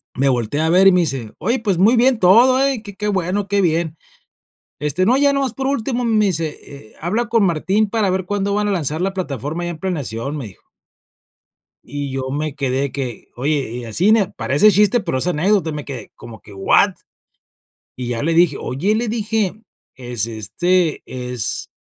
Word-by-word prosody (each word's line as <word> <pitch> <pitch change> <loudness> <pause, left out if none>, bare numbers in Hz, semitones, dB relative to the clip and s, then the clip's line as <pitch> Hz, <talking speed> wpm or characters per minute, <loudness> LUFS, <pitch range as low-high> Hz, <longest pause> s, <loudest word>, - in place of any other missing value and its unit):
me 135 +2 +2
voltea 130 +5 0
a - - +1
ver, 185 +3 +5
y - - +8
me 180 -1 +3
dice: 135 -9 -3
"Oye, 235 +6 0
pues, 200 -6 0
muy 215 +7 +5
bien 245 0 +3
todo, 235 +8 +5
eh, 265 -5 -1
que 205 -3 -10
qué 210 +1 -3
bueno, 190 0 -1
qué 200 0 +1
bien, 165 -2 0 0.8
este, 150 +6 0
no, 255 +5 +4
ya 280 0 +3
nomás 270 -4 -1
por 265 +1 -3
último", 250 -2 -1
me 215 -2 +2
dice: 165 -5 -1
"Eh, 140 -6 -13
habla 210 +9 -1
con 225 -2 +2
Martín 190 +5 +1
para 215 -3 0
ver 190 0 -1
cuándo 200 +1 -1
van 210 0 0
a - - 0
lanzar 155 -3 -2
la 190 +1 -1
plataforma 155 - -4
allá 175 - -3
en 160 - -9
planeación", 145 -6 -3
me 130 - -5
dijo 90 - -16 1.2
yo 135 -1 -4
me 150 0 -3
quedé 135 -1 -1
que, 130 -4 -5
oye, 140 0 -1
y 120 0 -5
así 170 - +1
n 215 -4 +4
parece 205 +10 +3
chiste, 210 +5 +3
pero 165 -8 -2
es 170 - 0
anécdota, 180 0 +1
me 150 -1 -6
quedé 135 -4 -7
como 115 -2 -11
que, 105 - -14
¿what? 95 0 +3 1.0
Y 125 -1 -5
ya 115 +1 -2
le 165 +2 +1
dije: 165 -4 +3
"Oye", 180 +12 -1
le 235 +2 -1
dije: 215 -3 -1 0.4
"Es 120 -4 -3
este, 160 - 0
es 125 -3 -3
175 Hz, 195 wpm, -19 LUFS, 140-205 Hz, 1.2 s, y